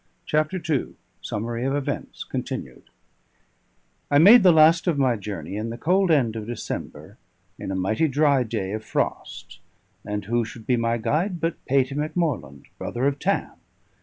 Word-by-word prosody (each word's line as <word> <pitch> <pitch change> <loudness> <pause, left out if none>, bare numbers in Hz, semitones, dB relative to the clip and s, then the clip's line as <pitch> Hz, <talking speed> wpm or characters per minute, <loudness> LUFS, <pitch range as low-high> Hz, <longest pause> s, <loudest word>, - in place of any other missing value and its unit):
CHAPTER 155 +5 0
II 150 -5 -1 0.3
SUMMARY 115 +3 -4
OF 135 +2 0
EVENTS 145 -2 -4
(continued) - - -5 1.3
I 145 - +4
made 210 +10 +9
the 185 -2 +7
last 160 +2 +5
of 165 -4 +2
my 130 -3 +2
journey 100 -4 -6
in 110 +2 -3
the 115 - -6
cold 185 +6 +2
end 130 -8 +2
of 110 -1 -5
December, 120 -1 -6 0.4
in - - -6
a 95 - -2
mighty 110 - +1
dry 145 -1 +3
day 110 -5 -3
of 110 +1 -4
frost, - - -4 0.4
and 105 -1 -4
who 120 +3 +1
should 110 0 -10
be 125 - +2
my 115 0 0
guide 160 - -1
but 165 +1 -3
Patey 135 0 +2
Macmorland, 145 - -2
brother 120 +2 -3
of 140 0 0
Tam! 200 +5 0
130 Hz, 165 wpm, -24 LUFS, 110-155 Hz, 1.3 s, made